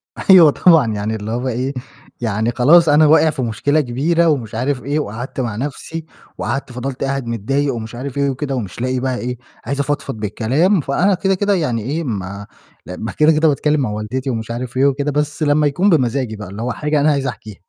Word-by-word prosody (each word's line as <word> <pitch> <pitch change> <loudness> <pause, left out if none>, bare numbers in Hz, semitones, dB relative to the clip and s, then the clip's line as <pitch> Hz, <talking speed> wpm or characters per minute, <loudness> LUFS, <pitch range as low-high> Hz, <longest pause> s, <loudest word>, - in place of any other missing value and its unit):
أيوه 175 -6 +6
طبعًا، 155 -12 +4
يعني 105 +2 -2
اللي 110 +1 -5
هو 125 +3 -2
إيه 130 +3 -2 0.5
يعني 110 +1 0
خلاص 155 +7 +5
أنا 150 +1 +5
واقع 160 +1 +5
في 145 -3 -3
مشكلة 135 +7 +1
كبيرة، 155 +7 +1
ومش 120 -8 -1
عارف 125 +2 -1
إيه 145 +3 -1
وقعدت 120 +1 -5
مع 115 -5 -2
نَفسي، 150 +5 -5 0.3
وقعدت 135 +3 -3
فضلت 125 +2 -5
قاعد 135 -2 -2
متضايق 135 +5 -1
ومش 115 0 -6
عارف 135 +2 -6
إيه 140 0 +1
وكده، 135 +1 -3
ومش 115 -1 -5
لاقي 130 0 -1
بقى 130 -1 -1
إيه 125 0 -4 0.3
عايز 140 0 -3
أفضفض 140 -2 -2
بالكلام، 130 - +1
فأنا 180 +9 +1
كده، 195 +1 +1
كده 205 +1 +1
يعني 125 - 0
إيه 150 +9 -3
ما 100 -4 -5 0.4
ل 90 - -6
ما 115 - -3
كده، 155 +1 +4
كده 155 +1 +3
باتكلِّم 150 +1 +1
مع 120 - -1
والدتي 110 +6 -4
ومش 115 -1 -3
عارف 125 +1 -5
إيه 135 - +4
وكده، 140 +1 +1
بس 150 +2 -1
لمّا 145 0 +3
يكون 180 +8 +1
بمزاجي 130 - +1
بقى 105 -2 -8
اللي 100 +3 -7
هو 125 +2 -2
حاجة 150 +3 -1
أنا 150 +2 +3
عايز 140 -2 -1
احكيها. 110 -5 -7
135 Hz, 210 wpm, -18 LUFS, 115-150 Hz, 0.5 s, أيوه